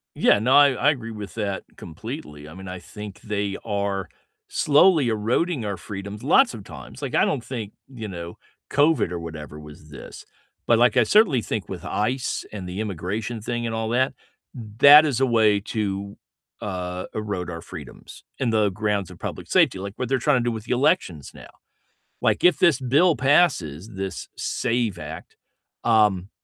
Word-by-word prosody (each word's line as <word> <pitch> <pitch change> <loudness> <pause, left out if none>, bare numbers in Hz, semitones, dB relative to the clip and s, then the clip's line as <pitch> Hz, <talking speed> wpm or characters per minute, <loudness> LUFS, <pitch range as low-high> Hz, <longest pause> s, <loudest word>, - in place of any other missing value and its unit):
Yeah. - - +4
No. 125 +5 +2
I 145 0 +8
I 145 +3 +3
agree 115 -5 -6
with 105 -4 -8
that 100 -3 -3
completely. 90 - -8
I 80 - -11
mean, 95 0 -10
I 90 0 -6
think 105 +1 -10
they 105 -2 -3
are 100 -4 -2 0.4
slowly 150 -3 +4
eroding 115 +6 0
our 100 -3 -3
freedoms, 100 +3 -7
lots 235 - +4
of 105 - -8
times. - - -11
Like, - - -3
I - - +4
don't 120 - -1
think, 115 -4 -6 0.2
you 120 -5 -8
know, 85 -3 -7 0.3
COVID 145 - +2
or 90 - -3
whatever 75 -2 -8
was 75 0 -13
this. 70 - -11 0.4
But, 115 - +5
like, 120 +2 +4
I 120 - +5
certainly 170 - +4
think 105 -2 -4
with 95 -2 -7
ICE 125 +5 -2
and 95 -4 -7
the 90 +3 -5
immigration 105 +3 -4
thing 120 +1 -3
and 115 - -3
all 110 0 -2
that, 130 +3 +1 0.4
that 130 +7 +6
is 135 -5 0
a 135 - +4
way 110 -4 +3
to, 100 -2 -4 0.4
uh, 90 -2 -4
erode 100 -5 -3
our 85 -1 -6
freedoms - - -11
in 125 -3 0
the 105 -2 +3
grounds 100 -1 -2
of 90 - -13
public - - -6
safety, 95 - +3
like 100 +1 -6
what 125 - -3
they're 135 -1 +1
trying 140 +2 +3
to - - -1
do 120 - 0
with 110 -1 -6
the - - -6
elections 125 - +1
now. - - -13 0.7
Like, - - +1
if 180 -4 +5
this 170 -6 +4
bill 150 +7 +3
passes, 130 - +2
this 95 0 -5
SAVE 115 -6 -1
Act, - - -9 0.5
um, 105 -5 +3
110 Hz, 180 wpm, -23 LUFS, 95-125 Hz, 0.7 s, I